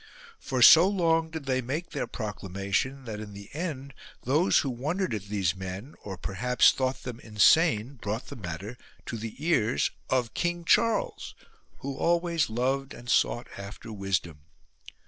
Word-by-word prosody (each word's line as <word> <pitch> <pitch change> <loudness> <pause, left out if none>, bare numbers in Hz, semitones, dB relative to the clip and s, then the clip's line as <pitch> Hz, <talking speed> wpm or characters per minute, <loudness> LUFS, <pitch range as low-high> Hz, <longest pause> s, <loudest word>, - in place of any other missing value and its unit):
For 130 -2 0
so 165 +8 +9
long 165 -4 +2
did 160 -3 -6
they 130 -1 +1
make 145 +8 -4
their - - -3
proclamation 105 +4 -3
that 110 -2 -5
in 105 -1 -8
the 100 0 -11
end 140 -4 -4 0.3
those 150 +9 +3
who - - 0
wondered 155 +8 -2
at 105 -3 -4
these 100 -4 0
men, 95 +8 -7
or 95 -3 -7
perhaps 125 +8 +3
thought 130 0 -2
them 120 -2 -6
insane, 115 - +3
brought 105 +4 -3
the - - -9
matter 100 +4 -7 0.3
to - - -5
the 115 0 -6
ears 135 -6 +1 0.2
of 125 -3 0
King 175 0 -2
Charles, 230 +5 +1 0.5
who 140 0 -4
always 170 -2 +1
loved 130 +4 -1
and 120 0 -5
sought 120 - +2
after 100 +3 -8
wisdom. 95 -6 -2
125 Hz, 155 wpm, -28 LUFS, 105-155 Hz, 0.5 s, so